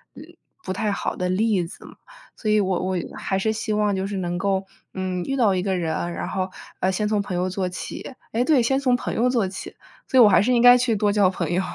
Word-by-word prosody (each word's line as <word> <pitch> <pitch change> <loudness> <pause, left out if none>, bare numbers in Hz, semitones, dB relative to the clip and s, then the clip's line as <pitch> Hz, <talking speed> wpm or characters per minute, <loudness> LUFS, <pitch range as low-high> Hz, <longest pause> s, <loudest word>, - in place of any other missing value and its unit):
呃， - - -10 0.4
不 - - -4
太 210 +3 -1
好 200 - -3
的 180 - -1
例 195 -1 +1
子 165 - -12
嘛， - - -13 0.4
所 215 - -3
以 215 - +4
我 190 -2 0
我 185 0 -1 0.2
还 190 - -2
是 220 +3 +1
希 215 0 -3
望 210 -1 +1
就 190 0 -2
是 200 0 -4
能 175 -1 -2
够， 195 0 0 0.3
嗯， 185 -1 -3
遇 270 - -2
到 220 -6 +3
一 180 - 0
个 190 -1 0
人， 170 0 -2
然 - - -4
后， 185 0 -2 0.3
呃， 185 - +1
先 210 +3 -1
从 210 -1 +1
朋 195 -2 -5
友 185 +1 0
做 185 0 -2
起， 185 +8 -7 0.2
诶， 235 +2 +2
对， 285 -3 +4
先 265 +3 +1
从 255 -3 +2
朋 245 - -3
友 245 +3 +2
做 235 -6 +1
起， 190 +1 -8 0.3
所 260 - +3
以 - - +10
我 210 - +7
还 190 - +5
是 250 +5 +2
应 240 - +3
该 245 +1 +8
去 245 -2 +1
多 205 0 +1
交 200 -2 +4
朋 175 -3 -3
友。 180 +2 +1
200 Hz, 280 characters per minute, -23 LUFS, 185-225 Hz, 0.4 s, 以